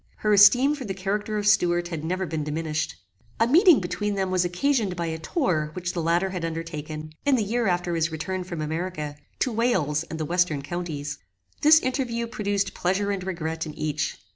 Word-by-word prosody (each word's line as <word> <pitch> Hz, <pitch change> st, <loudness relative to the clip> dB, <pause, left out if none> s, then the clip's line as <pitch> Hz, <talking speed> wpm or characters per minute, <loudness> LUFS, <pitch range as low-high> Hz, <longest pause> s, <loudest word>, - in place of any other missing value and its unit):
Her 210 Hz, -, +4 dB
esteem 245 Hz, +8 st, +7 dB
for 290 Hz, -3 st, -5 dB
the 195 Hz, -5 st, -4 dB
character 205 Hz, +3 st, -2 dB
of 205 Hz, -, -2 dB
Stuart 175 Hz, -4 st, +3 dB
had 160 Hz, -3 st, -5 dB
never 185 Hz, +3 st, -1 dB
been 160 Hz, -2 st, -3 dB
diminished. 150 Hz, -, -2 dB, 0.4 s
A 225 Hz, -, +5 dB
meeting 335 Hz, -, +6 dB
between 200 Hz, +3 st, -2 dB
them 190 Hz, -1 st, -1 dB
was 185 Hz, -1 st, +2 dB
occasioned 200 Hz, +2 st, 0 dB
by 170 Hz, -1 st, -2 dB
a 160 Hz, 0 st, -3 dB
tour 160 Hz, -, 0 dB
which 180 Hz, +1 st, -4 dB
the 170 Hz, -, -2 dB
latter 170 Hz, +4 st, +1 dB
had 180 Hz, -3 st, -4 dB
undertaken, 155 Hz, -2 st, -5 dB
in 285 Hz, -2 st, +3 dB
the 230 Hz, -, +1 dB
year 230 Hz, +2 st, 0 dB
after 175 Hz, -1 st, 0 dB
his 165 Hz, 0 st, 0 dB
return 180 Hz, +4 st, -3 dB
from 175 Hz, -3 st, -5 dB
America, 155 Hz, -1 st, -3 dB, 0.3 s
to 255 Hz, -, +2 dB
Wales 190 Hz, -, +1 dB
and 160 Hz, -1 st, -7 dB
the 155 Hz, -, -1 dB
western 170 Hz, -4 st, +1 dB
counties. 150 Hz, -3 st, -4 dB, 0.4 s
This 310 Hz, +2 st, +8 dB
interview 250 Hz, -3 st, -1 dB
produced 205 Hz, -3 st, -1 dB
pleasure 195 Hz, +3 st, 0 dB
and 195 Hz, -2 st, -3 dB
regret 165 Hz, -3 st, -3 dB
in 150 Hz, -, -8 dB
each. 155 Hz, -1 st, -2 dB
180 Hz, 195 wpm, -25 LUFS, 160-210 Hz, 0.4 s, This